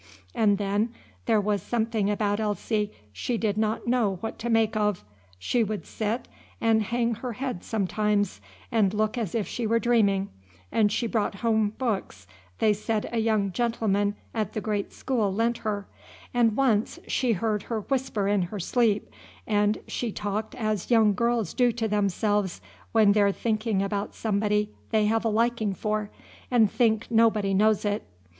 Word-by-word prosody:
And 205 -2 +3
then 205 +3 -1 0.3
there 225 -2 +4
was 205 0 0
something 225 -3 0
about 205 0 0
Elsie 210 0 -1 0.2
she 235 - -2
did 215 -2 0
not 215 0 -1
know 235 -5 +2
what 225 - -5
to 235 - -3
make 225 -1 +2
of: 210 - 0 0.3
she 230 - +1
would 215 -1 -4
sit 220 +3 -3 0.3
and 225 -1 +3
hang 235 +2 0
her 240 +2 -5
head 250 -6 -4
sometimes, 205 - 0 0.3
and 210 -3 +2
look 215 +1 +1
as 225 -6 -3
if 220 -3 0
she 235 -3 -3
were 230 +1 +3
dreaming; 205 -4 +2 0.4
and 210 -2 +3
she 240 - 0
brought 220 -3 0
home 220 -2 +2
books 205 - -3 0.3
they 215 - +3
said 215 +1 -2
a 235 - 0
young 215 -3 +1
gentleman 205 -2 0 0.2
up 225 - 0
at - - -24
the - - -2
great 210 -2 -2
school 225 -7 -1
lent 230 +4 0
her; 205 -2 -3 0.5
and 230 -3 +3
once 230 -6 +2
she 250 -3 +1
heard 210 +1 -1
her 225 -2 -1
whisper 245 -5 -1
in 205 -1 +2
her 180 +4 -4
sleep, 215 +2 +1 0.4
and 210 0 +2
she 240 -3 -3
talked 210 +2 -3
as 215 -5 -2
young 220 -3 +5
girls 235 -3 0
do 245 -2 +3
to 225 -1 -1
themselves 205 -1 0 0.3
when 215 -3 +5
they're 200 -1 +4
thinking 215 -2 0
about 200 0 -3
somebody 210 -1 0 0.2
they 215 -2 +2
have 225 +1 +1
a 225 - +1
liking 220 -2 +1
for 210 +1 -2 0.4
and 225 -5 +4
think 225 -3 +2
nobody 220 -3 +3
knows 215 +2 +3
it. 205 0 0
215 Hz, 170 wpm, -26 LUFS, 205-230 Hz, 0.5 s, young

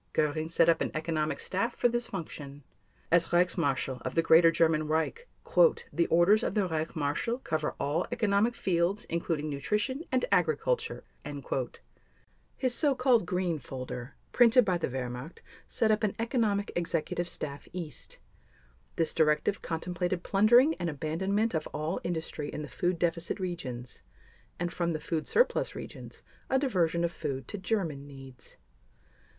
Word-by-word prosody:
Göring 155 +1 0
set 165 0 +3
up 165 -1 +4
an - - 0
economic 155 -1 -1
staff 215 +6 -2
for - - +3
this 240 0 -1
function. 145 -6 -7 0.5
As 170 0 +5
Reichsmarshal 155 -7 +1
of - - -5
the 165 - +3
Greater 165 +1 +7
German 160 -2 +2
Reich, 160 - -1 0.7
"the 170 - +2
orders 175 +6 +5
of - - -2
the 205 -3 +2
Reich 160 -1 -3
Marshal 155 +11 -1
cover 155 -11 -2
all 150 +5 0
economic 225 0 +2
fields, 180 +2 0
including 165 -2 -1
nutrition 210 - -1
and - - +2
agriculture." - - +1 1.5
His 255 -2 +1
so 285 0 +3
called 250 -3 +3
"Green" 180 -4 -1
folder, 125 -1 -7 0.2
printed 245 0 +6
by 180 -3 +1
the - - -1
Wehrmacht, 125 +4 -5 0.3
set 220 -1 +1
up 215 +1 +1
an 210 - +1
"Economic 225 -4 0
Executive 175 0 -1
Staff, 140 -3 -6
East." 165 -7 -7 0.8
This 165 - 0
directive 155 +4 +2
contemplated 175 +2 -2
plundering 240 +9 +5
and 175 - -1
abandonment 190 +9 -1
of 155 -2 -1
all 155 +4 -3
industry 160 -3 -3
in 150 - -5
the - - -6
food 175 +4 -1
deficit 170 +3 -1
regions 130 -10 -5 0.6
and, 175 0 -2
from 170 -1 -1
the 155 - -2
food 155 +1 -3
surplus - - +2
regions, - - -9 0.3
a 265 - +3
diversion 175 - +1
of 170 - +1
food 135 -6 -4
to 205 - -5
German 170 -9 -2
needs. 135 -3 -12
170 Hz, 150 wpm, -29 LUFS, 155-205 Hz, 1.5 s, Greater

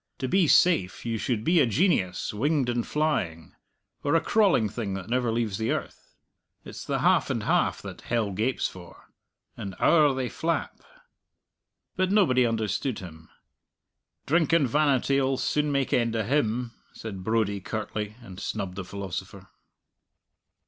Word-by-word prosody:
"To 130 - -3
be 185 +4 +3
safe 120 - +3
you 115 -1 -2
should 110 -2 -1
be 170 +6 +3
a 135 - +4
genius 105 - +1
winged 135 +3 +1
and 120 -1 -1
flying, 95 - -1 0.5
or 145 +3 +2
a - - +6
crawling 195 - +3
thing 105 -2 -4
that 95 +3 -7
never 125 -1 +1
leaves 110 -3 -1
the 110 - -1
earth. - - -5 0.5
It's - - -8
the - - -2
half - - +3
and - - -1
half - - +1
that - - -8
hell 115 -4 -1
gapes 110 +7 0
for. 90 -2 -13 0.5
And 95 -2 -6
owre 150 -5 +4
they 130 -1 -1
flap." 165 +6 -3 1.2
But 185 0 +1
nobody 130 - +4
understood 115 +2 -1
him. 80 -3 -11 1.0
"Drink 165 +2 +2
and 160 -5 +4
vanity'll 135 -1 +2
soon 150 +2 0
make 140 -2 0
end 115 -2 +1
of 110 -2 0
him," 120 -2 0 0.2
said 100 -4 -7
Brodie 105 -2 0
curtly, 105 0 -4
and 95 -4 -10
snubbed 100 -3 -4
the 100 - -3
philosopher. 95 0 -7
115 Hz, 150 wpm, -26 LUFS, 100-140 Hz, 1.2 s, a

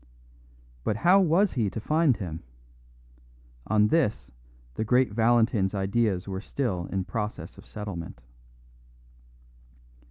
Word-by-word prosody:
But 105 - 0
how 180 - +5
was 185 +2 +3
he 115 -6 0
to 110 - -5
find 155 +2 +2
him? 85 -5 -6 1.3
On 105 0 +3
this 105 - 0 0.4
the 110 - -2
great 125 +1 +2
Valentin's 110 -3 +2
ideas 100 -1 0
were 95 -1 -4
still 105 -8 -3
in 95 -1 -2
process 105 +3 -5
of - - -15
settlement. 100 - -7
110 Hz, 115 wpm, -27 LUFS, 95-125 Hz, 1.3 s, how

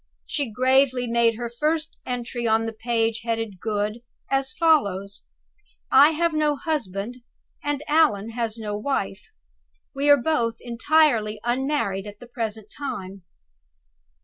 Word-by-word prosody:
She 285 -5 -2
gravely 255 +2 +3
made 235 -1 +2
her 240 +1 -4
first 305 +6 -1
entry 240 -1 -3
on 225 0 +2
the 225 - -4
page 225 0 -1
headed 225 -4 -3
"Good," 210 +2 -2 0.3
as 270 -1 +1
follows: 200 - +1 0.6
"I 280 +3 +8
have 335 +1 +1
no 305 -1 +2
husband, 245 - -3 0.5
and 290 0 -2
Allan 290 -9 +3
has 230 -1 -3
no 210 -2 -4
wife. 210 -4 -3 0.7
We 280 +1 0
are 285 - +8
both 240 -5 0
entirely 235 -3 +2
unmarried 240 -5 -1
at 205 0 -10
the - - -11
present 220 -3 -5
time." 200 -9 -6
235 Hz, 130 wpm, -24 LUFS, 215-280 Hz, 0.7 s, I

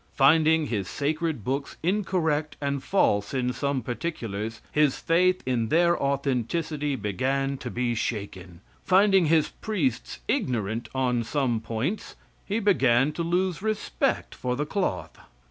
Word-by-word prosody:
Finding 155 +3 +5
his 105 -8 -2
sacred 155 - -2
books 135 +5 -3
incorrect 160 -6 0
and 140 -1 -2
false 105 - +1
in 125 -1 0
some 135 0 -1
particulars, 115 -5 -4
his 150 -3 +3
faith 180 +2 +2
in 120 -3 0
their 170 +5 +4
authenticity 140 +2 -1
began 135 +6 -1
to 125 - -5
be 120 0 -1
shaken; 95 -6 -4 0.2
finding 195 -2 +4
his 160 -1 +3
priests 150 - -2
ignorant 115 - -1
on 125 -2 +1
some 120 -1 0
points, 115 - -3 0.3
he 205 - 0
began 135 - +3
to 170 - -4
lose 180 +2 0
respect 215 0 -1
for 125 0 -2
the 145 +3 -1
cloth. 190 +5 -3
140 Hz, 130 wpm, -26 LUFS, 120-165 Hz, 0.3 s, Finding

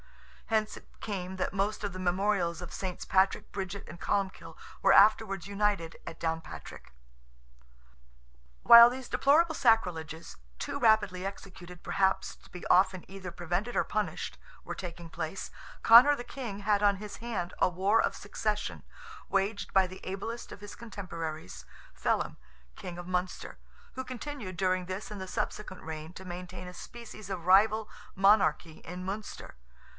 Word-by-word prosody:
Hence 215 -1 +1
it - - -16
came 190 -3 -4
that 185 - -2
most 200 +2 -1
of 200 -2 -2
the 185 - -6
memorials 185 -1 +1
of 175 - -6
SS. 185 -2 -5
Patrick, 190 0 +2
Bridget, 195 0 -5
and 170 - -11
Columbkill, 195 -1 -2 0.2
were - - +5
afterwards 195 -4 +5
united 200 -4 0
at 165 - -7
Downpatrick. 165 0 -5 1.7
While 235 0 +11
these 255 0 -6
deplorable 320 +4 +4
sacrileges, 175 - +1 0.2
too - - -4
rapidly 215 -6 +3
executed 185 -2 -9
perhaps 190 -1 +1
to - - -20
be 180 - -9
often 185 -1 +3
either 190 -2 -7
prevented 175 +7 -2
or - - +4
punished, 210 0 -3 0.3
were - - -5
taking 170 -2 -7
place, 160 +4 -5 0.3
Conor 250 +6 +9
the 245 - -5
King 230 -7 -6
had 205 0 +2
on 200 -1 +5
his 205 0 -8
hand 210 -7 -4
a - - +4
war 195 +5 +3
of - - 0
succession, 210 0 -3 0.5
waged 200 +2 0
by 190 -1 +5
the 185 +1 -11
ablest 215 +5 -5
of - - -10
his 205 0 -9
contemporaries, 165 - -6 0.3
Felim, - - 0 0.4
King 175 -1 -7
of 175 0 -7
Munster, 180 0 -3 0.3
who 260 - -4
continued 255 -6 -6
during 185 -1 +1
this 190 +3 -5
and 205 -2 -6
the 190 - -5
subsequent 190 +1 -4
reign 160 0 -6
to 190 - -10
maintain 180 0 -7
a 180 - -8
species 215 0 -10
of 180 -4 -4
rival 210 +3 +5 0.3
monarchy 190 -5 +3
in 180 +2 -7
Munster. 205 - -6
195 Hz, 150 wpm, -30 LUFS, 180-215 Hz, 1.7 s, While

